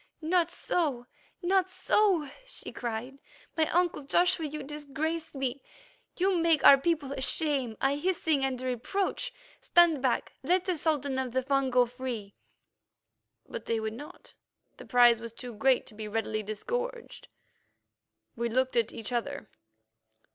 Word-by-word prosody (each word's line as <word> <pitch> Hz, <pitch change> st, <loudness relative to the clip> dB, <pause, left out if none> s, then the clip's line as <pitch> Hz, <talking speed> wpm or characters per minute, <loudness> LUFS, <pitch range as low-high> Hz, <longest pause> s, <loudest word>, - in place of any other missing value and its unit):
"Not 340 Hz, +1 st, +2 dB
so, 285 Hz, -9 st, -1 dB, 0.4 s
not 375 Hz, +1 st, +2 dB
so," 375 Hz, -4 st, +2 dB, 0.2 s
she -, -, -7 dB
cried. 245 Hz, +3 st, -5 dB, 0.3 s
"My 315 Hz, -1 st, +2 dB
uncle 350 Hz, -3 st, +1 dB
Joshua, 340 Hz, +3 st, +2 dB
you 300 Hz, 0 st, -6 dB
disgrace 300 Hz, +3 st, -4 dB
me; 270 Hz, 0 st, -2 dB, 0.6 s
you 375 Hz, 0 st, +2 dB
make 330 Hz, -3 st, +3 dB
our 275 Hz, -, +10 dB
people 295 Hz, -2 st, 0 dB
a 270 Hz, -, -5 dB
shame, 270 Hz, -6 st, 0 dB
a 270 Hz, +1 st, +2 dB
hissing, 320 Hz, -3 st, 0 dB
and 265 Hz, -2 st, -1 dB
a 255 Hz, -, -5 dB
reproach. 380 Hz, -, -2 dB, 0.3 s
Stand 340 Hz, -5 st, +4 dB
back; 260 Hz, -2 st, 0 dB
let 360 Hz, +6 st, +1 dB
the 365 Hz, -2 st, 0 dB
Sultan 285 Hz, -4 st, -1 dB
of 255 Hz, -2 st, -3 dB
the 260 Hz, 0 st, +1 dB
Fung 275 Hz, 0 st, +1 dB
go 250 Hz, 0 st, +4 dB
free." 240 Hz, -5 st, -6 dB, 1.1 s
But -, -, -7 dB
they 230 Hz, -1 st, 0 dB
would 220 Hz, 0 st, -3 dB
not; 290 Hz, +6 st, -11 dB, 0.4 s
the -, -, -11 dB
prize 240 Hz, -2 st, +5 dB
was 230 Hz, -1 st, -7 dB
too 245 Hz, 0 st, -8 dB
great 255 Hz, +4 st, +2 dB
to -, -, -7 dB
be 215 Hz, 0 st, -6 dB
readily 215 Hz, 0 st, -2 dB
disgorged. 475 Hz, -, -5 dB, 1.1 s
We 235 Hz, -1 st, -1 dB
looked 260 Hz, +2 st, 0 dB
at 230 Hz, -2 st, +2 dB
each 225 Hz, +1 st, -5 dB
other. 245 Hz, 0 st, -3 dB
275 Hz, 150 wpm, -29 LUFS, 245-330 Hz, 1.1 s, our